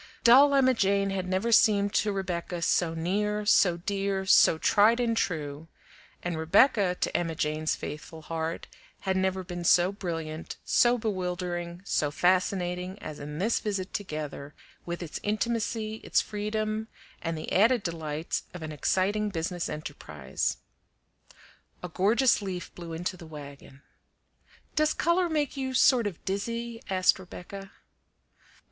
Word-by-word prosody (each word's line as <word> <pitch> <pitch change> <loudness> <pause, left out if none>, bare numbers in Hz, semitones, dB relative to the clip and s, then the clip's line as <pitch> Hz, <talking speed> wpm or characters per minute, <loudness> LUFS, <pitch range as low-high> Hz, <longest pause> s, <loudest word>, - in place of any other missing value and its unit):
Dull 275 +4 +7
Emma 260 -1 +5
Jane 200 -3 +1
had 190 -1 -3
never 190 +5 0
seemed 205 -2 +4
to 215 - +2
Rebecca 175 -3 -3
so 165 -1 +1
near, 210 +5 -1
so 180 -4 +4
dear, 195 +1 -2
so 175 -3 +6
tried 220 +7 +4
and 235 -2 +1
true; 155 -6 -2 0.6
and 175 -2 -2
Rebecca, 190 - +4
to - - -1
Emma 165 -2 0
Jane's 155 0 -1
faithful 155 +1 -8
heart, 165 +1 -4 0.4
had 190 -1 -1
never 190 0 0
been 175 0 -6
so 175 +2 +4
brilliant, 165 -5 -5
so 240 0 +4
bewildering, 180 -4 -3
so 150 -6 +1
fascinating, 180 +2 0
as 155 -6 -8
in 150 +1 -7
this 215 +7 +1
visit 200 -3 -3
together, 150 -6 -5 0.3
with 175 +1 -4
its 160 - -6
intimacy, 220 0 -1
its - - +2
freedom, 215 +1 -2 0.3
and 165 -1 -3
the 155 - -6
added 225 +3 +4
delights 160 -2 -3
of 180 - -7
an 155 - -5
exciting 200 +7 0
business 175 -1 -3
enterprise. 75 - -4 1.3
A 180 - -4
gorgeous 215 +8 +3
leaf 185 -3 -5
blew 170 -1 -8
into 175 +3 -3
the 170 -2 -11
wagon. 140 -2 -11 0.9
"Does 305 0 +2
color 345 +1 +2
make 300 -3 -1
you 260 -1 -3
sort 245 -3 +5
of 185 -5 -8
dizzy?" 230 +4 -3
asked 185 0 +3
Rebecca. 190 +2 -9
185 Hz, 140 wpm, -28 LUFS, 165-210 Hz, 1.3 s, Dull